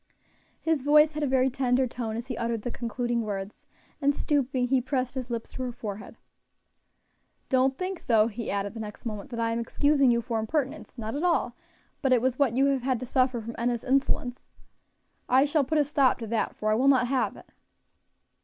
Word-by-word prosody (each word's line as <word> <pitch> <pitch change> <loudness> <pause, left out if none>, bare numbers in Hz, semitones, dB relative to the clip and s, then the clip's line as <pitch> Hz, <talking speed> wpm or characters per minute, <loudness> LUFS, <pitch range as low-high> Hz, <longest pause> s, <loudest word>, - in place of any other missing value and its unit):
His 320 -4 0
voice 300 +2 +5
had 305 0 -5
a 295 - +1
very 260 0 +3
tender 260 0 +1
tone 230 -3 -4
as 235 - -5
he 250 -1 -4
uttered 230 -1 -2
the 245 - -3
concluding 240 0 -2
words, 200 -2 -6 0.3
and 285 0 +3
stooping, 265 -4 0
he 260 0 +2
pressed 255 -1 -2
his 255 -2 -5
lips 230 -1 -4
to - - -6
her 250 -1 -2
forehead. 215 -4 -7 1.3
"Don't 265 0 +2
think, 370 -1 -5
though," 220 -3 +5
he 230 0 -4
added 200 0 -2
the 230 - -8
next 210 +2 -8
moment, 215 +2 -5
"that 235 -2 -5
I 230 0 +1
am 230 - -1
excusing 280 +3 +2
you 235 -1 +3
for 230 -1 -2
impertinence, 275 +5 -3
not 220 -1 -4
at 290 - -2
all; 335 -9 +1 0.5
but 270 - +1
it 250 - +5
was 255 +2 -1
what 255 -4 +2
you 270 - +4
have 275 -2 +1
had 255 -1 0
to - - -3
suffer 255 -1 +1
from 230 +2 -7
Enna's 240 0 -1
insolence. 260 -2 0 0.9
I 260 +2 +5
shall 295 0 +2
put 310 +4 0
a 300 - +5
stop 280 -2 +2
to 230 - -6
that, 225 +1 -1
for 215 0 -1
I - - +4
will 250 +5 +2
not 260 -3 +5
have 260 +1 0
it." - - -14
250 Hz, 210 wpm, -27 LUFS, 230-275 Hz, 1.3 s, voice